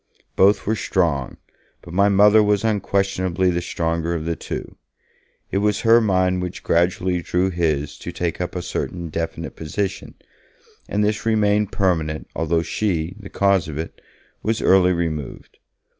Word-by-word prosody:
Both 100 +2 +4
were 110 - +1
strong, 80 - -1 0.5
but 85 - -10
my 100 +2 +4
Mother 105 +2 +6
was 105 0 +2
unquestionably 95 -4 0
the 85 0 -1
stronger 85 0 -2
of 80 -1 -4
the 85 0 -1
two; - - -6 0.8
it 100 - +1
was 105 0 +1
her 115 +1 +6
mind 95 -3 +1
which 90 -1 -5
gradually 90 +1 +1
drew 90 +2 0
his 75 -4 -1
to - - -6
take 85 0 -3
up 90 - -4
a 90 - -3
certain 85 -1 -4
definite 80 +1 -4
position, 95 +4 -4 0.7
and 105 +1 +1
this 105 -2 0
remained 105 -2 +2
permanent 80 -5 0
although 80 0 0
she, 85 -1 -2
the 100 -2 -10
cause 100 -4 +2
of 75 -2 -6
it, 80 +1 -6 0.4
was 110 0 0
early 95 -1 +4
removed. 80 -5 -4
90 Hz, 155 wpm, -21 LUFS, 85-100 Hz, 0.8 s, Mother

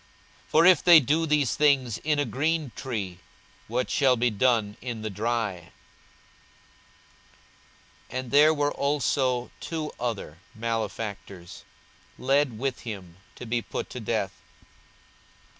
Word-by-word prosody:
42:023:031 - - -30
For 160 +2 +5
if 180 -4 +6
they 175 -2 +9
do 155 +4 +1
these 150 -4 +2
things 135 -7 +2
in 150 -1 0
a 145 - +1
green 150 +4 -1
tree, 100 -9 -5 0.5
what 125 +3 -2
shall 135 -3 +4
be 120 0 +1
done 110 -2 +1
in 120 -3 -5
the 110 - -3
dry? 105 -4 -2 2.4
42:023:032 130 - -3
And 130 -2 -7
there 150 +2 +6
were 145 -2 0
also 135 -3 0
two 160 -2 -4
other, 110 -10 -4 0.2
malefactors, 110 -5 -5 0.5
led 135 -2 +1
with 130 +2 -2
him 95 -7 -8 0.2
to - - -9
be 120 +1 -1
put - - -6
to - - -6
death. - - -3
125 Hz, 130 wpm, -26 LUFS, 110-145 Hz, 2.4 s, they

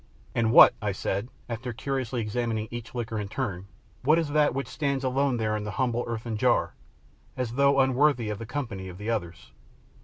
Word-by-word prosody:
"And 115 -1 +1
what," - - +9
I 105 -2 -1
said, 100 +4 -2 0.2
after 120 +1 -4
curiously 130 -1 -2
examining 110 0 -2
each 120 0 -7
liquor 115 -2 -3
in 105 - -3
turn, 100 -6 -4 0.3
"what 155 +5 +4
is 165 -3 0
that 150 -1 +2
which 135 - -2
stands 140 -3 -2
alone 130 0 +1
there 110 -1 0
in 105 - -3
the 105 - -4
humble 120 -2 0
earthen 115 -1 -3
jar, - - +2 0.6
as 125 -3 -2
though 140 +1 +4
unworthy 130 -3 +3
of 105 - -5
the 115 - -7
company 115 -9 -4
of 90 - -9
the 105 +3 -3
others." 85 - -4
120 Hz, 190 wpm, -27 LUFS, 110-135 Hz, 0.6 s, what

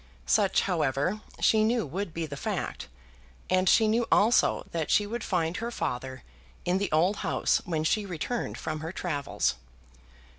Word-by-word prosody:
Such, 200 -3 +3
however, 165 +3 0 0.2
she 220 -1 +4
knew 230 0 +1
would 180 +5 -4
be 165 +1 -3
the 145 -2 -7
fact, 130 - -4 0.6
and 185 0 +3
she 220 - +5
knew 230 +2 +1
also 225 +4 +4
that 165 -2 -2
she 210 - +4
would 225 +2 -4
find 175 -1 -1
her 230 +1 -3
father 130 - -4 0.4
in 180 +1 +1
the 200 - -2
old 175 +6 +3
house - - +1
when 160 -3 -1
she 205 +6 +1
returned 190 +7 -3
from 155 -1 -4
her 160 +2 -5
travels. 140 - -1
180 Hz, 160 wpm, -28 LUFS, 155-210 Hz, 0.6 s, she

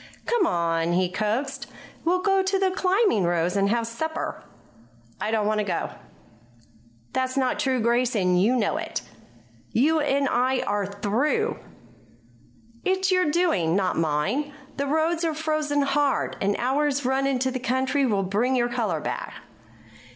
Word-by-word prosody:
"Come 470 -7 +2
on," 170 0 0
he 180 0 +2
coaxed. 255 +8 -2 0.4
"We'll 365 +2 +1
go 390 -1 +3
out 380 - 0
to 390 0 +2
the 380 -1 +2
Climbing 375 - +2
Rose 175 +1 +1
and 200 0 +2
have 230 +1 +1
supper." 315 +8 -4 0.8
"I - - -1
don't 220 -2 +1
want 215 0 +1
to - - +1
go." 200 - -2 1.2
"That's 260 0 -1
not 260 -2 +1
true, 260 -2 +1
Grace, 235 +2 +1
and 180 -3 +2
you 230 +6 +3
know 220 -5 +1
it." - - -4 0.7
"You 310 +7 +3
and 280 -1 +1
I 255 +1 +1
are 205 -1 -1
through." 205 +8 0 1.2
"It's 380 0 +1
your 365 -4 +3
doing, 295 - +1
not 190 -2 +1
mine. 165 - 0 0.3
The 280 0 -1
roads 320 +3 +1
are 325 -2 0
frozen 310 -2 0
hard; 280 0 +1
an 200 +1 +1
hour's 280 +2 0
run 265 +1 +1
into 260 -1 0
the 255 - -3
country 260 +3 0
will 205 -6 +1
bring 215 +8 +1
your 240 -1 +1
color 215 -10 -1
back." - - -4
255 Hz, 160 wpm, -25 LUFS, 205-300 Hz, 1.2 s, go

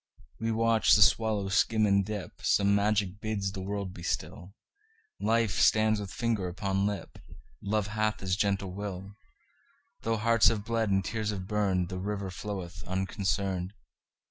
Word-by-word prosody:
We 115 0 -1
watch 115 0 +3
the 105 - +3
swallow 105 -2 +2
skim 110 +2 +3
and 100 -1 +3
dip; 105 -1 -6
Some 100 0 +3
magic 100 -1 +1
bids 100 -3 -2
the 95 - -6
world 100 -1 -4
be 85 - -10
still; 90 +2 -4 0.6
Life 110 -6 +1
stands 110 +6 +4
with 100 -2 -6
finger 115 -7 -1
upon 95 +2 -1
lip; 105 -1 -5 0.4
Love 105 0 0
hath 110 +1 -1
his 95 -1 0
gentle 100 -1 0
will; 100 -1 -6 0.9
Though 115 0 0
hearts 115 +1 +4
have 105 -2 +1
bled, 115 -2 0
and 95 -1 +1
tears 110 +1 -2
have 95 -3 -3
burned, 95 -3 0
The 95 -1 -4
river 100 0 -3
floweth 95 -2 -6
unconcerned. 95 0 -2
100 Hz, 155 wpm, -29 LUFS, 95-110 Hz, 0.9 s, stands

